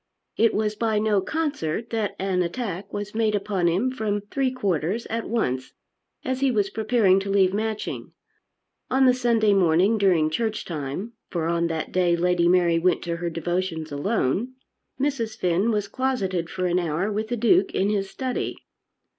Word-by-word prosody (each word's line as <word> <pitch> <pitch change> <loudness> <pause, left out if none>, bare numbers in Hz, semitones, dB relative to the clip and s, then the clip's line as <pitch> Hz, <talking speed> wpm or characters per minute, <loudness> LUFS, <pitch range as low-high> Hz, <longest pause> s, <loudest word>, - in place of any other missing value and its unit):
It 230 0 +3
was 215 0 0
by 220 0 0
no 210 -2 +2
concert 235 - -2
that 220 -3 -1
an 190 -1 0
attack 195 0 -4
was 205 0 -5
made 220 -1 +1
upon 195 -3 0
him 195 +10 +1
from 215 -5 -2
three 270 -2 +1
quarters 200 - -1
at 230 0 -3
once 130 - -1 0.5
as 260 0 -1
he 275 0 +3
was 205 -5 +1
preparing 215 -4 +3
to 195 +1 -5
leave 195 -1 +3
Matching. 215 +1 -3 0.8
On 265 +1 +3
the 255 - +6
Sunday 230 -4 +2
morning 190 +4 +3
during 170 -6 +3
church 220 +4 -2
time, 160 - -5 0.2
for 170 -3 -2
on 170 0 +1
that 160 -1 -3
day 180 -2 +2
Lady 175 0 +2
Mary 175 -2 +4
went 180 +2 +1
to 170 -1 -3
her 170 0 -2
devotions 170 -1 -3
alone, 200 - -1 0.4
Mrs. 245 -6 -1
Finn 180 +4 +1
was 210 -3 0
closeted 200 -9 -1
for 185 -1 -3
an 180 0 +2
hour 175 +4 -1
with 215 +1 -2
the 240 +1 -2
Duke 350 - +3
in 200 +2 +2
his 195 -2 -1
study. 260 -2 -3
200 Hz, 170 wpm, -24 LUFS, 175-230 Hz, 0.8 s, the